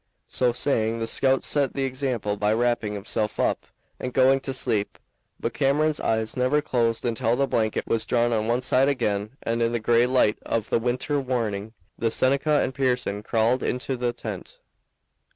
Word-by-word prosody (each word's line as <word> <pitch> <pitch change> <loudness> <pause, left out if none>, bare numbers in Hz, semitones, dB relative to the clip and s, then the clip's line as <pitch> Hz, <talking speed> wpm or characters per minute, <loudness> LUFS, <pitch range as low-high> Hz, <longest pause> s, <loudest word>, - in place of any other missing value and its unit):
So 125 -1 +1
saying, 115 -3 0
the 115 - -2
scout 135 +3 +2
set 140 -3 +1
the 135 - -1
example 130 -6 -2
by 105 +1 +1
wrapping 120 -2 0
himself 105 +1 -3
up - - 0 0.3
and 125 - -4
going 130 +1 +4
to 135 - -5
sleep, 110 -5 -1 0.4
but 115 - -3
Cameron's 150 +3 +1
eyes 110 0 -1
never 130 +4 +2
closed 120 -6 0
until 115 0 +1
the 140 - +2
blanket 110 -5 -1
was 115 - -1
drawn 120 0 +2
on 110 -1 0
one 120 +2 0
side 130 +2 +3
again 105 -3 -2
and 115 +1 -1
in 115 0 +1
the 120 - 0
gray 120 +2 +3
light 125 -4 +2
of 115 -2 -2
the - - +3
winter 125 +5 -1
morning 110 -5 -2 0.3
the 115 - +1
Seneca 140 +5 +2
and 130 - -1
Pearson 125 -6 -1
crawled 115 +4 +1
into 125 +1 -2
the 120 -1 -1
tent. - - -8
120 Hz, 180 wpm, -25 LUFS, 110-130 Hz, 0.4 s, going